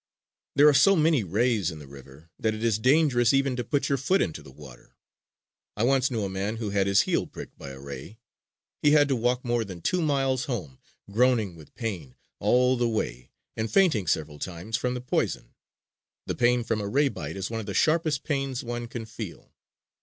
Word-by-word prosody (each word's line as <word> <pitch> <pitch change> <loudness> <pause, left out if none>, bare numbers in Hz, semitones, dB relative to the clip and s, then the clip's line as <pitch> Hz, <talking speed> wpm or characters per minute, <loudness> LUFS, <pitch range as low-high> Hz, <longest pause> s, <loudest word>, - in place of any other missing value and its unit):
There 145 +2 +7
are 150 - +7
so 195 +9 +6
many 155 - +3
rays 105 0 +1
in 80 - -7
the 75 - -11
river 70 +3 -14
that 110 -1 0
it 110 - -6
is 110 -2 +2
dangerous 130 -2 +3
even 135 -1 +1
to 125 - -2
put 145 +4 0
your 140 -2 0
foot 185 +9 +2
into 80 -1 -2
the 70 - -14
water. 65 -3 -15 0.8
I 105 - 0
once 135 +1 +3
knew 115 -5 -2
a - - -1
man 95 +3 -3
who 110 -3 -3
had 100 -1 +1
his 100 0 +5
heel - - 0
pricked - - -10
by 70 - -8
a 65 0 -10
ray. 70 +9 -9 0.6
He 145 0 +4
had 145 -1 +5
to 135 - +2
walk 125 +2 0
more 120 -1 +1
than 95 -5 -8
two 180 - 0
miles 135 -4 +1
home, 95 - -5 0.3
groaning 110 -4 +2
with 80 -2 -16
pain 95 - -5 0.2
all 125 +1 +3
the 120 -1 +1
way 65 - -3 0.3
and 110 0 -2
fainting 160 - +3
several 75 -2 -1
times 90 +6 -5
from 125 +1 -1
the 125 - -4
poison. 125 - -2 0.7
The - - -2
pain 120 0 +2
from 115 -2 -1
a 100 - -3
ray 140 +7 +2
bite 130 - -6
is 95 - -4
one 115 - -2
of 110 - -7
the 100 - -4
sharpest 155 -3 +2
pains 135 -3 -2
one 120 0 -4
can 115 -1 -6
feel. 110 -4 -9
115 Hz, 210 wpm, -26 LUFS, 95-130 Hz, 0.8 s, There